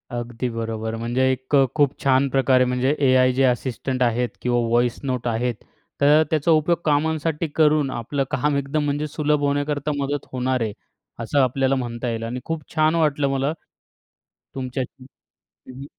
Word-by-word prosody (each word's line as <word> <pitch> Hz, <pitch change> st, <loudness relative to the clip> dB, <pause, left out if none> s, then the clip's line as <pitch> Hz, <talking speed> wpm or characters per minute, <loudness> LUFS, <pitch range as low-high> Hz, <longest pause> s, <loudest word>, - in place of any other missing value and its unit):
अगदी 120 Hz, +1 st, -4 dB
बरोबर, 115 Hz, -1 st, -4 dB
म्हणजे 120 Hz, +3 st, -1 dB
एक 130 Hz, +2 st, -2 dB
अ, 135 Hz, -1 st, +6 dB
खूप 145 Hz, -2 st, +2 dB
छान 135 Hz, 0 st, +3 dB
प्रकारे 130 Hz, -1 st, +3 dB
म्हणजे 125 Hz, +3 st, +1 dB
एआय 130 Hz, 0 st, +4 dB
जे 135 Hz, +1 st, +1 dB
असिस्टंट 130 Hz, 0 st, 0 dB
आहेत 120 Hz, +1 st, +1 dB
किंवा 120 Hz, -1 st, +1 dB
व्हॉइस 120 Hz, 0 st, +1 dB
नोट 125 Hz, -3 st, -2 dB
आहेत, 120 Hz, 0 st, -1 dB, 0.5 s
तर 150 Hz, +2 st, +6 dB
त्याचा 155 Hz, +1 st, +1 dB
उपयोग 160 Hz, +2 st, +3 dB
कामांसाठी 155 Hz, +2 st, 0 dB
करून 150 Hz, -3 st, +3 dB
आपलं 135 Hz, +4 st, -2 dB
काम 145 Hz, +3 st, 0 dB
एकदम 140 Hz, +2 st, -1 dB
म्हणजे 145 Hz, +1 st, -1 dB
सुलभ 150 Hz, 0 st, 0 dB
होण्याकरता 145 Hz, +1 st, 0 dB
मदत 140 Hz, 0 st, -2 dB
होणार 130 Hz, 0 st, -1 dB
आहे, 110 Hz, -2 st, -1 dB, 0.5 s
असं 115 Hz, +5 st, 0 dB
आपल्याला 135 Hz, +1 st, +2 dB
म्हणता 120 Hz, -1 st, -3 dB
येईल 115 Hz, 0 st, -3 dB
आणि 120 Hz, +2 st, -4 dB
खूप 165 Hz, -1 st, -3 dB
छान 155 Hz, +1 st, +3 dB
वाटलं 150 Hz, -3 st, +1 dB
मला 135 Hz, +2 st, 0 dB, 1.0 s
तुमच्या 130 Hz, 0 st, -3 dB, 0.2 s
हं, 130 Hz, -, -19 dB, 0.5 s
हं. 135 Hz, +2 st, -9 dB
135 Hz, 160 wpm, -22 LUFS, 125-145 Hz, 1.0 s, अ